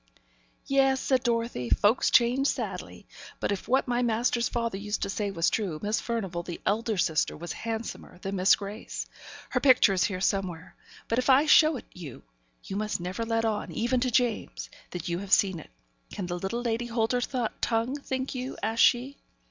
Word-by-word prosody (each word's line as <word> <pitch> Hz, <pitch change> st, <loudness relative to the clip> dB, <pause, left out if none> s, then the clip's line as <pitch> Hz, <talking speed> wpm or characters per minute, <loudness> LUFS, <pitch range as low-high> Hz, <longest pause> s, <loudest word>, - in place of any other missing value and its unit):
'Yes,' 270 Hz, -1 st, +3 dB
said 260 Hz, -1 st, +1 dB
Dorothy. 230 Hz, -, -1 dB
'Folks 210 Hz, -, +3 dB
change 250 Hz, +3 st, +4 dB
sadly. -, -, -4 dB, 0.3 s
But -, -, -1 dB
if 200 Hz, -, -3 dB
what 265 Hz, +2 st, +2 dB
my 245 Hz, 0 st, +1 dB
master's 235 Hz, 0 st, +1 dB
father 230 Hz, -3 st, -2 dB
used 210 Hz, +1 st, -3 dB
to -, -, -2 dB
say 205 Hz, 0 st, -2 dB
was 165 Hz, -4 st, +1 dB
true, 185 Hz, -8 st, -2 dB
Miss 210 Hz, +2 st, 0 dB
Furnivall, 195 Hz, -7 st, -3 dB
the 170 Hz, -1 st, -7 dB
elder 220 Hz, +1 st, 0 dB
sister, 160 Hz, -3 st, +1 dB
was 170 Hz, +2 st, -6 dB
handsomer 225 Hz, -5 st, -5 dB
than 195 Hz, +2 st, -4 dB
Miss 185 Hz, +2 st, +5 dB
Grace. 205 Hz, +2 st, -6 dB, 0.5 s
Her -, -, +1 dB
picture 255 Hz, -7 st, +5 dB
is 185 Hz, -1 st, +2 dB
here 185 Hz, -3 st, -2 dB
somewhere; 185 Hz, -3 st, -2 dB, 0.3 s
but, 230 Hz, -, +1 dB
if 255 Hz, -, -1 dB
I 270 Hz, +3 st, +6 dB
show 310 Hz, -1 st, +6 dB
it -, -, -10 dB
you, 160 Hz, -9 st, -9 dB, 0.4 s
you 195 Hz, -, -5 dB
must 210 Hz, -1 st, -2 dB
never 180 Hz, +6 st, -4 dB
let 225 Hz, 0 st, 0 dB
on, 215 Hz, -2 st, -2 dB
even 240 Hz, +3 st, 0 dB
to 255 Hz, +1 st, 0 dB
James, 240 Hz, -2 st, -1 dB, 0.2 s
that 180 Hz, -, -6 dB
you 170 Hz, 0 st, -1 dB
have 195 Hz, 0 st, -8 dB
seen 190 Hz, -4 st, +4 dB
it. -, -, -13 dB, 0.4 s
Can 195 Hz, -, -4 dB
the 175 Hz, 0 st, -4 dB
little 230 Hz, +6 st, -3 dB
lady 235 Hz, 0 st, -1 dB
hold 230 Hz, -1 st, 0 dB
her 250 Hz, -1 st, +1 dB, 0.4 s
tongue, 230 Hz, +3 st, 0 dB
think 260 Hz, -1 st, -3 dB
you?' 255 Hz, 0 st, -5 dB
asked 225 Hz, +1 st, +1 dB
she. 255 Hz, +3 st, +3 dB
225 Hz, 190 wpm, -28 LUFS, 195-245 Hz, 0.5 s, I